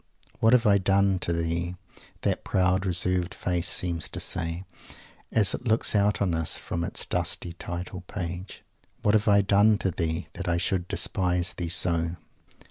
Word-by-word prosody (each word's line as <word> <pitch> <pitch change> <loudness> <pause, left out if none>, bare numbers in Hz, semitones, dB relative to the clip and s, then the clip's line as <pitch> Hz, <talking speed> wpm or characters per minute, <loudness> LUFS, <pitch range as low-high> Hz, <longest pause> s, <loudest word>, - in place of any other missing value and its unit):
"What 115 +2 +4
have 120 -2 +4
I 100 -1 +5
done 95 0 +2
to 85 - -2
thee?" 85 +1 -2 0.5
that - - -1
proud, 95 0 +1
reserved 90 0 0
face 90 -1 0
seems 85 -4 0
to - - -2
say, 85 +2 -3 0.7
as 105 -3 +3
it 125 - -5
looks 110 +1 +2
out 100 0 +2
on 90 -4 0
us 80 -1 -1
from 85 - -4
its - - -1
dusty 85 - -2
title 90 +1 -6
page; 90 0 -6 0.4
"what 105 - +3
have 105 0 +2
I 100 -1 +5
done 105 +2 +4
to 95 - -1
thee, 80 0 -3
that 95 - -6
I 85 - +1
should 90 0 -1
despise 90 -1 0
thee 85 -2 -4
so?" 85 -1 +3
90 Hz, 170 wpm, -26 LUFS, 85-100 Hz, 0.7 s, I